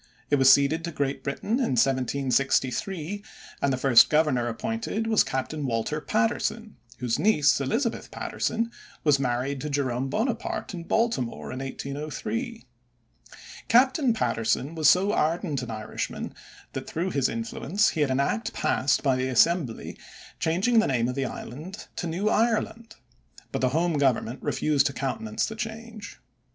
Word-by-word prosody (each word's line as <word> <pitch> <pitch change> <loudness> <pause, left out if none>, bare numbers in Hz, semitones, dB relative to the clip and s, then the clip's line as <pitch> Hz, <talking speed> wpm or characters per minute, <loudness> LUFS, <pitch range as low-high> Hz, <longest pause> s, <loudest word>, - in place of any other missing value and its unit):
It 145 - +5
was 135 0 +7
ceded 140 +4 +4
to 170 - -4
Great 140 -3 -2
Britain 205 - -1
in 240 - +1
1763, 135 - 0 0.4
and 140 - +2
the 130 - 0
first 130 -2 +6
Governor 150 -6 +2
appointed 225 - -3
was 225 -1 +4
Captain 140 +3 -3
Walter 120 +6 -1
Patterson, 220 +5 -1 0.2
whose 120 -2 -1
niece, 150 -9 +4
Elizabeth 225 - -1
Patterson, 230 +1 -2 0.3
was 145 -3 +4
married 130 +1 -1
to 150 - -3
Jerome 135 -2 -1
Bonaparte 220 - -2
in 170 -2 -6
Baltimore 225 - -1
in 130 - -5
1803. 155 - -5 1.0
Captain 260 +2 +4
Patterson 125 - 0
was 160 -2 +4
so 195 +3 +4
ardent 155 -3 0
an 125 - -6
Irishman 110 -1 -5 0.4
that - - -5
through 175 +4 -2
his 140 -4 +1
influence 135 - 0
he 155 - -2
had 145 - +2
an 130 +1 +1
act 210 +11 -1
passed 130 -1 +1
by 135 -3 +3
the 130 0 -1
Assembly 130 0 +1 0.4
changing 190 +9 +2
the 220 - +2
name 120 -2 +1
of - - -2
the 135 0 -1
island 155 - -7
to 175 - -2
New 180 +6 -1
Ireland, 225 +1 0 0.6
but - - -2
the 130 - +3
home 160 +2 +1
Government 130 -2 +1
refused 145 -3 +2
to 140 - -4
countenance 215 - -2
the 220 - -6
change. 225 -1 -7
150 Hz, 150 wpm, -26 LUFS, 130-215 Hz, 1.0 s, was